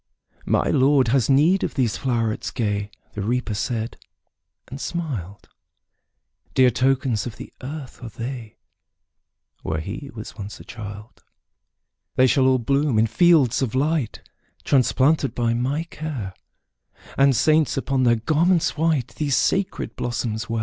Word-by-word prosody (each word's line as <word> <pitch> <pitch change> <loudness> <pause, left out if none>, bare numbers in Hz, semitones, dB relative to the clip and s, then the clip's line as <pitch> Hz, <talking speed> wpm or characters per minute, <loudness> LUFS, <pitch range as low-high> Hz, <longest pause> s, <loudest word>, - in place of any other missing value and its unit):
``My - - +2
Lord 135 -2 +4
has 130 +1 +2
need 155 +8 +4
of - - -3
these 125 -6 +1
flowerets 115 -4 -1
gay,'' 105 -3 -2 0.2
The 105 - -4
Reaper 120 +2 -1
said, 115 +2 -3 0.7
and 135 +3 -8
smiled; 115 - -5 1.1
``Dear 130 -2 +5
tokens 130 -3 +1
of 115 - -8
the - - -10
earth 135 -1 -8
are 120 - -6
they, 115 0 -7 1.0
Where 80 0 -2
he 110 - -6
was 110 - -8
once 105 -1 -8
a - - -11
child. 105 0 -10 0.9
``They 130 - +6
shall 130 +1 +3
all 130 0 +4
bloom 135 +1 +1
in 110 - +5
fields 140 - +4
of 130 -2 -1
light, 145 -2 -1 0.4
Transplanted 135 +2 +2
by 120 -1 +1
my 130 +7 -1
care, 150 - -6 0.8
And 135 -1 +4
saints, 155 +4 +3
upon 135 0 0
their 120 -2 +4
garments 160 +8 +2
white, 155 -6 +1
These 140 +2 -1
sacred 195 0 0
blossoms 115 -2 -3
wear.'' 115 0 -1
130 Hz, 140 wpm, -23 LUFS, 115-145 Hz, 1.1 s, ``They